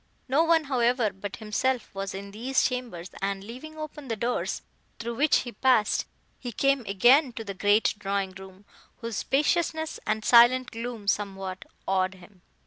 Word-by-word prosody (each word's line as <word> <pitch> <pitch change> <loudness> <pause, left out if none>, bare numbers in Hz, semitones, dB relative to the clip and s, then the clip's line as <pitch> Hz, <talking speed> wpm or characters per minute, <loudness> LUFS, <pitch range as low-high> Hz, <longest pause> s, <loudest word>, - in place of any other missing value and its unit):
No 280 +5 +3
one, 330 -1 +4
however, 245 -5 +1
but 195 +1 -6
himself, 235 +3 -1
was 195 0 -4
in 200 +1 -7
these 250 +6 0
chambers, 240 -9 -5
and 195 0 -2
leaving 260 +9 -9
open 300 -2 -7
the 230 - -1
doors 235 +3 -2 0.3
through 235 +1 -4
which 290 +6 +3
he 245 - -7
passed, 235 -1 +2 0.3
he 245 - -5
came 275 +4 +2
again 245 +8 +5
to 225 - -6
the 200 -2 -5
great 205 +3 +3
drawing 195 -1 -1
room, 190 +1 -13 0.4
whose 230 -3 -4
spaciousness 315 +2 0
and 215 0 -1
silent 245 +2 +6
gloom 230 -2 -6
somewhat 195 -2 -2 0.2
awed 190 0 +1
him. 185 0 -17
230 Hz, 160 wpm, -27 LUFS, 200-260 Hz, 0.4 s, silent